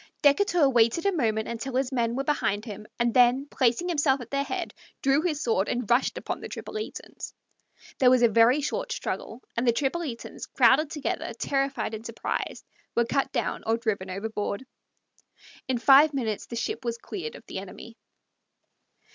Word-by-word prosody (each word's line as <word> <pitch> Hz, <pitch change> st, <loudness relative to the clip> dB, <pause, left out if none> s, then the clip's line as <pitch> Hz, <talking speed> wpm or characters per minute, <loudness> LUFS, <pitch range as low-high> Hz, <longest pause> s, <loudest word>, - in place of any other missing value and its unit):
Decatur 335 Hz, +1 st, +4 dB
waited 240 Hz, -, +3 dB
a 400 Hz, -, +4 dB
moment 220 Hz, -, 0 dB
until 245 Hz, +3 st, -4 dB
his 265 Hz, 0 st, 0 dB
men 235 Hz, -2 st, 0 dB
were 270 Hz, -, -1 dB
behind 215 Hz, -8 st, 0 dB
him, 210 Hz, -1 st, -8 dB
and 235 Hz, -1 st, +1 dB
then, 250 Hz, +2 st, +4 dB
placing 255 Hz, +7 st, +1 dB
himself 290 Hz, -5 st, +2 dB
at 245 Hz, -2 st, -10 dB
their 275 Hz, 0 st, +1 dB
head, 280 Hz, -, -4 dB, 0.3 s
drew 275 Hz, +2 st, +4 dB
his 315 Hz, -3 st, -1 dB
sword 215 Hz, -4 st, +1 dB
and 245 Hz, -2 st, -2 dB
rushed 245 Hz, +3 st, +2 dB
upon -, -, -4 dB
the -, -, -7 dB
Tripolitans. 430 Hz, 0 st, -7 dB, 0.6 s
There 255 Hz, -, +6 dB
was 250 Hz, -1 st, +4 dB
a -, -, +8 dB
very 230 Hz, +6 st, +4 dB
short 300 Hz, -, -3 dB
struggle, 250 Hz, -, -4 dB
and 235 Hz, +2 st, 0 dB
the -, -, +7 dB
Tripolitans, 270 Hz, 0 st, -3 dB
crowded 290 Hz, +3 st, +4 dB
together, 290 Hz, -5 st, -3 dB
terrified 275 Hz, -2 st, -1 dB
and 220 Hz, 0 st, -6 dB
surprised, 230 Hz, 0 st, -4 dB, 0.3 s
were 235 Hz, -, +3 dB
cut 275 Hz, +2 st, 0 dB
down 240 Hz, -4 st, -2 dB
or 225 Hz, +1 st, +2 dB
driven 210 Hz, -5 st, -2 dB
overboard. 205 Hz, +4 st, -3 dB, 1.0 s
In 260 Hz, -1 st, +1 dB
five 275 Hz, +5 st, +6 dB
minutes 220 Hz, -6 st, -2 dB
the 235 Hz, -, -6 dB
ship 235 Hz, +1 st, -3 dB
was 235 Hz, -1 st, -2 dB
cleared 185 Hz, -10 st, -6 dB
of -, -, -13 dB
the -, -, -5 dB
enemy. 200 Hz, +4 st, -10 dB
245 Hz, 170 wpm, -27 LUFS, 230-275 Hz, 1.0 s, a